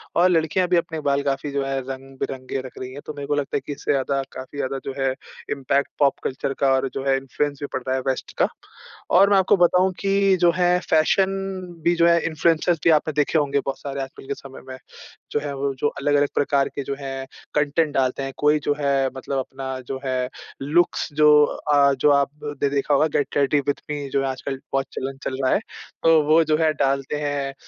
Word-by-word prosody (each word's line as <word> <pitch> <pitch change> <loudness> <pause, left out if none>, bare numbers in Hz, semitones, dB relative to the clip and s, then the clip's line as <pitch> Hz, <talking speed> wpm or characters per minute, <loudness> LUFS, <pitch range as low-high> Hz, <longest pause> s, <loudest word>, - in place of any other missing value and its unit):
और 180 +2 +5
लड़कियाँ 165 +1 +2
भी 180 0 +3
अपने 165 -1 -2
बाल 140 0 +2
काफ़ी 140 +1 -2
जो 140 0 -1
है 135 0 -1
रंग-बिरंगे 135 0 -5
रख 130 - -11
रही 130 0 -6
हैं। 145 - -8
तो 155 - -6
मेरे 145 -1 -7
को 145 - +1
लगता 145 -1 -1
है - - -4
कि - - -5
इससे - - -2
ज़्यादा 135 0 0
काफ़ी 130 +2 -9
ज़्यादा 135 -1 -2
जो 135 - -4
है 135 0 +2 0.4
इम्पैक्ट 140 0 0
पॉप 140 -2 +3
कल्चर 135 +1 -2
का 135 -1 +3
और 130 0 0
जो 135 - -4
है 135 0 +3
इन्फ्लुएंस 140 +2 -2
भी 145 - -3
पड़ 130 - -2
रहा 130 - +1
है 130 - -1
वेस्ट 130 - -2
का। - - +3 0.7
और 195 +2 +7
मैं 200 - +5
आपको 190 -1 +4
बताऊँ 180 +1 +4
कि 195 -1 +3
जो 175 - +6
है 180 0 +3
फैशन 160 +5 +4 0.6
भी 170 +1 +3
जो 170 0 +3
है 170 0 +5
इन्फ्लुएंसर्स 165 +1 +1
भी - - +4
आपने 155 0 +3
देखे 150 +2 +1
होंगे 140 -2 +1
बहुत 135 -1 -3
सारे 140 -1 -5
आजकल 135 0 -8
के 140 - -1
समय 135 -1 -11
में 130 0 -7 0.5
जो - - +1
है 145 -1 -4
वो 140 0 -1
जो 145 - +2
अलग-अलग 145 0 +1
प्रकार 140 -1 +2
के 140 - -3
जो 140 - -4
है 135 -1 -5 0.3
कंटेंट 150 +1 +1
डालते 130 0 0
हैं। 135 0 -5
कोई 150 +1 +3
जो 145 - +2
है 140 -2 +1
मतलब 135 +1 -4
अपना 130 0 -5
जो 135 - -4
है 130 -1 -1 0.3
लुक्स 160 +6 +1
जो 150 +1 +5 0.2
अ, 140 -1 +2
जो 135 +2 +2
आपने 145 0 0
देखा 140 +1 0
होगा 150 +3 +4
गेट 145 - 0
रेडी 145 +1 +3
विद 145 - 0
मी 145 -2 -4
जो 140 - 0
है - - 0
आजकल 130 +1 -4
बहुत 135 0 +1
चलन 135 +1 -4
चल 130 - -3
रहा 130 - +3
है। - - +3 0.4
तो 165 -1 +6
वो 155 +2 +5
जो 155 -1 +1
है 160 -1 +3
डालते 135 0 0
हैं। 145 -2 -2
140 Hz, 225 wpm, -23 LUFS, 135-155 Hz, 0.7 s, और